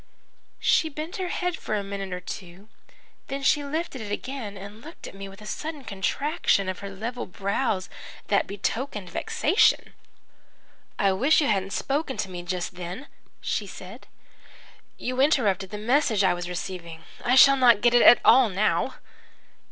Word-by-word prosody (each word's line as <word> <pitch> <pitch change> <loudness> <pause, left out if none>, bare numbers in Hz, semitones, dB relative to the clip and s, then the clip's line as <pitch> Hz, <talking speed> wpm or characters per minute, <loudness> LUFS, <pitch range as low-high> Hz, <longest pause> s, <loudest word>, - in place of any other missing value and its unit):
"She 320 - +2
bent 310 +3 -6
her 370 -1 -2
head 360 0 -2
for 215 - -3
a 205 - -2
minute 195 -1 -5
or 180 - -3
two. 185 +2 -9 0.6
Then 275 0 -4
she 290 +1 +3
lifted 285 -2 -4
it 205 -1 -6
again 225 -3 -5
and 200 +3 -10
looked 320 +6 -11
at - - -9
me 195 0 -8
with 195 +2 -13
a - - -10
sudden 300 +5 -5
contraction 200 - 0
of 185 -1 -3
her 200 - -6
level 230 +6 -5
brows 200 +1 -1 0.4
that 200 - +1
betokened 205 -1 -3
vexation. 450 -2 +2 1.0
"'I 200 -1 +3
wish 270 - +3
you 300 - +2
hadn't 195 -4 0
spoken 280 -1 -2
to 190 - -3
me 175 -1 -5
just 175 +1 -4
then,' 180 +9 -6 0.4
she - - -2
said. - - -11 0.9
'You 255 +1 -2
interrupted 210 - +2
the 210 - -6
message 225 -1 +2
I 185 -2 +4
was 175 0 -5
receiving. 170 -2 -6 0.2
I 245 +1 +3
shall 275 +1 +8
not 240 -5 +5
get 240 +1 +4
it 240 - +6
at 240 - +8
all 255 -3 +7
now.' 200 +3 0
210 Hz, 165 wpm, -25 LUFS, 195-275 Hz, 1.0 s, shall